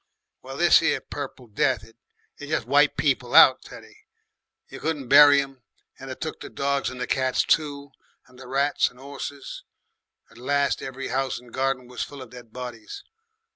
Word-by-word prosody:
"Well, - - -9
this - - +5
'ere - - +1
Purple 125 - -8
Death, 115 +1 0
it 115 +1 -17 0.4
jes' 145 -4 -3
wiped 145 +3 +3
people 130 -4 0
out, - - +8
Teddy. - - -14 0.7
You - - -10
couldn't 150 -5 -3
bury 145 0 +8
'em. 135 -2 -5 0.4
And - - -9
it - - -7
took - - -5
the - - -9
dogs 140 0 -1
and 125 0 -9
the 125 - -2
cats 130 -1 0
too, 145 -3 0 0.3
and 125 -1 -20
the 130 - -11
rats 140 +2 +1
and 125 - -21
'orses. 140 0 -8 0.7
At 115 - -17
last 140 +2 0
every 135 0 -6
house 135 0 -1
and 120 -1 -15
garden 135 -1 -1
was 125 0 -7
full 140 -2 -6
of 125 - -15
dead 120 -2 -13
bodies. 125 - -8
135 Hz, 175 wpm, -24 LUFS, 125-140 Hz, 0.7 s, out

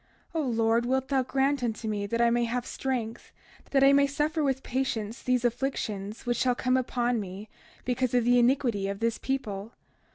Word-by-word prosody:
O 325 - 0
Lord, 230 -2 +1
wilt 265 +1 0
thou 270 -2 +2
grant 270 +2 0
unto 225 -2 -2
me 205 -1 -2
that 230 +3 -2
I 235 0 +4
may 240 0 +2
have 245 +1 -2
strength, 240 -4 -4 0.4
that 275 -1 +3
I 275 0 +7
may 280 0 +5
suffer 300 +3 -1
with 270 -1 0
patience 235 -4 -2
these 250 -1 +1
afflictions 220 -4 -2
which 240 0 0
shall 250 -1 +2
come 255 +1 +1
upon 245 -2 0
me, 200 +1 -7 0.4
because 250 0 0
of 245 - +4
the 245 +1 +4
iniquity 240 -5 +2
of 200 0 -4
this 230 0 0
people. 220 -5 -3
245 Hz, 190 wpm, -28 LUFS, 225-265 Hz, 0.4 s, I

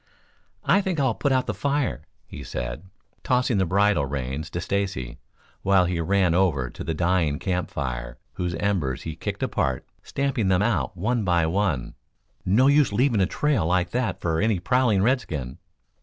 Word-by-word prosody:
"I 200 - +4
think 185 -5 -2
I'll 130 -4 +2
put 140 +5 -1
out 130 -1 +2
the - - -2
fire," 140 - -1 0.2
he - - -9
said, - - -5 0.4
tossing 125 -4 +1
the 95 - +1
bridle 100 -4 +2
reins 70 +3 -4
to 85 - -4
Stacy, 95 -10 -3 0.4
while 95 -2 +4
he 85 -1 -1
ran 95 0 +2
over 80 -9 +1
to - - -8
the 80 - -2
dying 85 -3 +1
camp 90 +1 -2
fire, 65 -2 -4 0.2
whose 90 -1 -3
embers 80 -9 -1
he 80 -1 -5
kicked - - -4
apart, 65 -2 -1 0.2
stamping 135 -7 -1
them 95 +1 +3
out 105 -4 0
one 110 +5 0
by 85 -3 +2
one. 85 -7 -1 0.5
"No 105 +8 +3
use 140 -2 +4
leaving 115 0 +2
a 95 - +3
trail 140 - 0
like 90 0 +1
that 125 -1 -1
for 80 -1 0
any 110 -3 +2
prowling 120 -2 +2
redskin." 80 - -1
95 Hz, 170 wpm, -24 LUFS, 80-115 Hz, 0.5 s, I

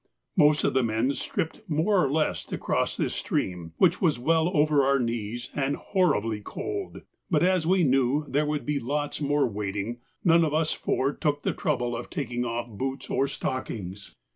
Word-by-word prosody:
Most 150 -3 +5
of - - +2
the 130 - +3
men 115 +3 +1
stripped 160 - -3
more 175 +5 +3
or 140 - +1
less 155 +1 0
to - - -4
cross - - -1
this - - -1
stream, 85 -3 -2
which 180 -1 +3
was 160 -8 +3
well 160 +6 +2
over 150 -1 +4
our 140 +1 +3
knees 115 -1 -3
and 140 0 0
horribly 115 - +1
cold, 405 - -5 0.3
but 165 -3 +3
as 180 -3 +2
we 185 0 +4
knew 135 +1 +2
there 150 +2 +1
would 150 0 -2
be 150 -1 0
lots 145 +5 -2
more 145 -1 +2
wading, 105 +2 -3 0.2
none 170 -1 +5
of 155 -1 0
us 160 0 +2
four 135 +2 0
took 145 0 -1
the - - 0
trouble 125 -5 -1
of 115 - -6
taking 125 -7 -3
off 120 0 -3
boots 130 +5 -5
or 135 - +2
stockings. 100 -8 -5
140 Hz, 185 wpm, -27 LUFS, 120-155 Hz, 0.3 s, Most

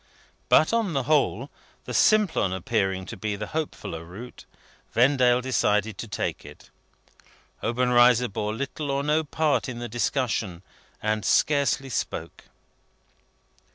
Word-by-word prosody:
But, 155 - +5
on 225 -6 +1
the 135 - 0
whole, 140 -3 +1 0.3
the - - -6
Simplon 210 - +3
appearing 95 -1 -1
to - - -8
be 105 +1 -3
the 105 +1 -5
hopefuller 150 - -4
route, 100 +9 -11 0.5
Vendale 125 0 +4
decided 110 -5 0
to 115 - -5
take 105 - -3
it. - - -14 0.9
Obenreizer 125 0 +4
bore 105 0 -3
little 140 +3 -4
or 140 0 0
no 150 +2 +2
part 150 -2 0
in 120 - -6
the 120 0 -5
discussion, 110 -5 -2 0.4
and 110 0 0
scarcely 140 -2 +2
spoke. 120 - -4
125 Hz, 125 wpm, -25 LUFS, 105-140 Hz, 0.9 s, But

